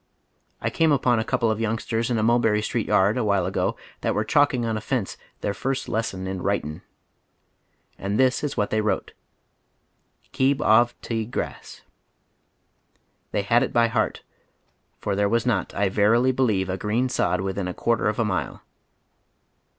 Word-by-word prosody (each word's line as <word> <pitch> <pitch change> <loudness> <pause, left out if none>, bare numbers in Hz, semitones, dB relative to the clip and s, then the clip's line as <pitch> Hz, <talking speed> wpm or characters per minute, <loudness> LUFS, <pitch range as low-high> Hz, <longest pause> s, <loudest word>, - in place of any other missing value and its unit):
I - - -1
came 160 -1 +2
upon 125 -4 +3
a - - 0
couple 115 0 +1
of 110 - -2
youngsters 115 +1 -1
in 120 - +1
a 110 - +1
Hulherry 110 -2 +3
Street 115 0 -2
yard 100 +5 +3
a - - 0
while 100 -4 +1
ago - - -1 0.2
that - - 0
were - - +1
chalking 140 -5 +2
on 115 - -1
the 110 - -3
fence 115 -3 -2 0.3
their 100 - -1
first 135 +6 -3
lesson 100 -4 -2
in 95 -1 -4
"writin'." 80 -6 -2 1.2
And 100 +2 -2
this 130 +1 +3
is 145 - -3
what 105 - 0
they 110 - +2
wrote: 105 - -2 1.2
"Keeb 135 +1 +2
of 120 -2 +3
te 110 -2 -2
Grass." 120 - -6 1.5
They 100 - 0
had 115 +4 +3
it 130 - -1
by 115 0 +4
heart, - - -1 0.7
for - - -2
there 100 0 +1
was 115 +1 +1
not, 115 -7 0
I 100 0 +2
verily 110 +6 +3
believe, 110 -8 +1
a 95 0 -2
green 115 +5 0
sod 90 -7 0
within 95 0 -3
a 90 - -3
quaiter 115 -2 +1
of 105 - -3
a 115 - +1
mile. 95 -3 -3
110 Hz, 175 wpm, -24 LUFS, 100-120 Hz, 1.5 s, by